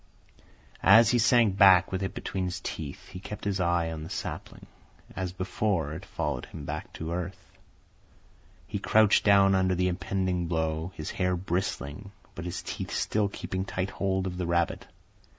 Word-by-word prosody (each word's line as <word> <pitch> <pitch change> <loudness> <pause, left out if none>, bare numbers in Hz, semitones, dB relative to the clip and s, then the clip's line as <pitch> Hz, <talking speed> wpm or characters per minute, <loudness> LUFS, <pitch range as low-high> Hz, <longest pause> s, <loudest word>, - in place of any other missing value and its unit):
As 115 0 +7
he 120 - +3
sank 115 -4 +4
back 95 -3 +7
with 95 0 -2
it 95 - -3
between 95 -1 -3
his 90 0 -3
teeth, 75 -4 -6
he 90 - -8
kept 105 +2 -8
his 100 -2 -1
eye 85 -2 +1
on 80 -1 -5
the 80 - -7
sapling. - - -6 0.5
As 95 -2 -3
before, 95 -3 -1
it 90 +4 -8
followed 75 -6 -3
him 70 - -9
back 75 +2 -5
to 80 +1 -5
earth. 90 +1 -6 1.1
He - - -4
crouched 110 -1 +4
down 100 -1 +5
under 95 -1 +2
the 90 +1 +1
impending 95 -1 -1
blow, 80 +1 -1
his 75 - -5
hair 90 -1 0
bristling, 90 0 -3 0.2
but 85 - -7
his 90 - -4
teeth - - -5
still 105 -1 0
keeping 95 -1 -4
tight 95 0 -3
hold 95 -1 -1
of 90 -1 -4
the 90 -2 -2
rabbit. 85 0 0
90 Hz, 170 wpm, -28 LUFS, 85-95 Hz, 1.1 s, As